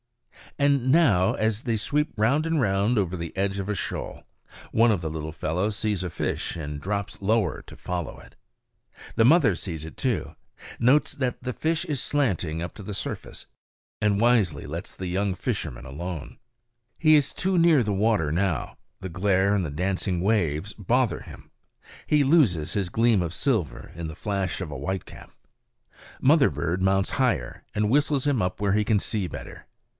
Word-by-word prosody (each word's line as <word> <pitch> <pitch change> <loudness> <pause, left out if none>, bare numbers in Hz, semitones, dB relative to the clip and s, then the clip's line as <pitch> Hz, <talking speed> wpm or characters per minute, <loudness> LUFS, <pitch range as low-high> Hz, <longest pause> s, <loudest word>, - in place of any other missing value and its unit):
And 140 -3 +2
now 115 - +4
as 110 0 -1
they 115 -3 0
sweep 150 +8 0
round 130 +9 +2
and 165 -1 +1
round 105 0 +2
over 95 -3 0
the 85 -2 -6
edge 100 0 0
of 100 +1 -4
a 105 - 0
shoal, - - -5 0.5
one 115 +1 +4
of 100 - +1
the 80 - -3
little 80 0 -5
fellows 90 +7 -1
sees 105 -4 -1
a 90 - -2
fish - - -3
and 75 -2 -5
drops 100 +2 -3
lower 105 -3 +1
to - - -14
follow 90 -3 -4
it. - - -17 0.8
The 115 - +4
mother 150 - +5
sees 80 -4 -5
it 80 - -10
too; - - -1 0.4
notes 130 +5 +3
that 130 -3 -2
the 125 0 -3
fish 165 +5 -1
is 145 -6 -2
slanting 95 - 0
up 85 - -6
to 105 - -9
the 100 +1 -5
surface, - - -6 0.6
and 105 -1 +2
wisely 110 -11 +2
lets - - -6
the 95 - -6
young 95 +1 0
fisherman - - -4
alone. 80 +3 -6 0.6
He 155 -1 +6
is 145 -2 +3
too 190 0 0
near 165 -5 +5
the 105 -2 -1
water 100 -6 +2
now; 85 -2 -1 0.2
the 95 - -5
glare 95 +2 +2
and 100 - +1
the 80 - -3
dancing 90 +2 -1
waves 95 -2 0
bother 120 +4 0
him; - - -13 0.6
he 150 -1 +4
loses 120 - +3
his 100 -4 -1
gleam 115 0 +3
of 85 -1 -3
silver 110 - -1
in 85 -1 -5
the 80 - -7
flash 100 -1 -2
of 85 -5 -5
a - - -5
whitecap. 95 +7 -5 0.9
Mother 145 +1 +5
bird 85 +2 -2
mounts 95 0 +2
higher, 115 - 0
and 105 0 +1
whistles 145 +1 +2
him 140 -5 +2
up 90 0 -2
where 100 -2 +1
he 105 +1 +3
can 105 -1 +2
see 100 -2 -2
better. - - -9
100 Hz, 180 wpm, -25 LUFS, 90-125 Hz, 0.9 s, He